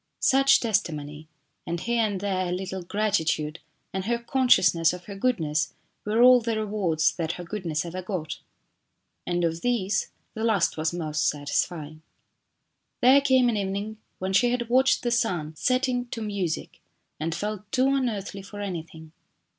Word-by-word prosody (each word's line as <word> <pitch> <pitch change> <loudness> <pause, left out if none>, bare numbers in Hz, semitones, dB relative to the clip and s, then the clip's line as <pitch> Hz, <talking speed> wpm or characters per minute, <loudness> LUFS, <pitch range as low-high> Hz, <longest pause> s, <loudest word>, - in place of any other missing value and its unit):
Such 270 0 +5
testimony, 155 -9 -2 0.4
and 170 0 -2
here 235 +3 0
and 205 -3 -1
there 185 -2 -1
a - - -3
little 190 +1 -4
gratitude 170 -6 -1 0.3
and 190 0 -3
her 235 +2 +1
con 255 +2 -1
sciousness 170 -6 +5
of 180 - -11
her 200 - -8
goodness 160 -10 0 0.3
were 220 +3 +3
all 250 0 +8
the 225 -1 -1
rewards 200 -7 +1
that 165 -1 -1
her 180 - -7
goodness 170 -4 -3
ever 180 +2 -5
got. 175 -5 -4 0.9
And 175 0 0
of 165 0 -1
these, 210 -5 0 0.2
the 220 - -4
last 215 -6 +2
was 160 0 -1
most 155 -3 -1
satisfying. 150 +1 -3 1.0
There 265 +3 +7
came 260 -3 +4
an 230 -3 +1
evening 200 +2 -3 0.2
when 190 +1 -3
she 240 +5 +4
had 240 -1 -2
watched 260 +2 +3
the 240 - 0
sun 180 - 0
setting 255 - 0
to 235 - -6
music 195 -6 -3 0.4
and 160 +1 -2
felt 210 +2 -5
too 260 +1 +3
unearthly 210 -7 -2
for 205 +1 -10
anything. 165 -5 -6
195 Hz, 160 wpm, -26 LUFS, 165-235 Hz, 1.0 s, all